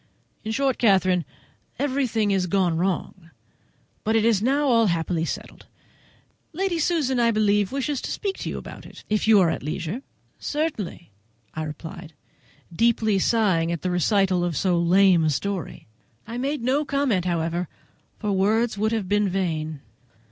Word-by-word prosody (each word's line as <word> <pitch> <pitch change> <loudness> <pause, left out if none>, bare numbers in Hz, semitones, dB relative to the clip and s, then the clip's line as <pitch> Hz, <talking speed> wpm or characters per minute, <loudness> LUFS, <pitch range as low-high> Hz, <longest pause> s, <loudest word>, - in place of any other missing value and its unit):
In 220 - -3
short, 270 +2 0
Catherine, 185 - +3 0.5
everything 255 -6 0
has 190 -2 +1
gone 180 -3 +1
wrong, 175 -1 -2 0.7
but 220 +1 +1
it 225 -1 +3
is 225 -4 +3
now 280 +5 +2
all 230 -3 +4
happily 165 -1 0
settled. - - -7 0.9
Lady 365 0 -1
Susan, 300 -6 +1
I 235 -1 +4
believe, 210 -2 +2
wishes 275 0 -2
to - - -5
speak 395 -2 -3
to - - -4
you - - -4
about - - -9
it, - - -14
if 215 0 0
you 220 -2 +7
are 170 -4 +4
at - - -4
leisure." 170 - -4 0.4
"Certainly," 290 - -3 0.4
I 155 - -4
replied, 160 +2 -7 0.6
deeply 220 -1 +2
sighing 185 -7 +2
at 170 - -4
the 185 - 0
recital 185 0 +2
of 175 -5 -1
so 180 0 +2
lame 180 0 +4
a 155 - +2
story. 190 +5 -3 0.4
I 230 +2 -5
made 280 0 -2
no 270 +5 +2
comments, 275 - 0
however, 170 0 -1 0.5
for 210 -2 -2
words 210 +3 +1
would 220 +2 +1
have 215 -4 -1
been 205 0 +2
vain. 160 -5 -2
200 Hz, 160 wpm, -24 LUFS, 175-235 Hz, 0.9 s, you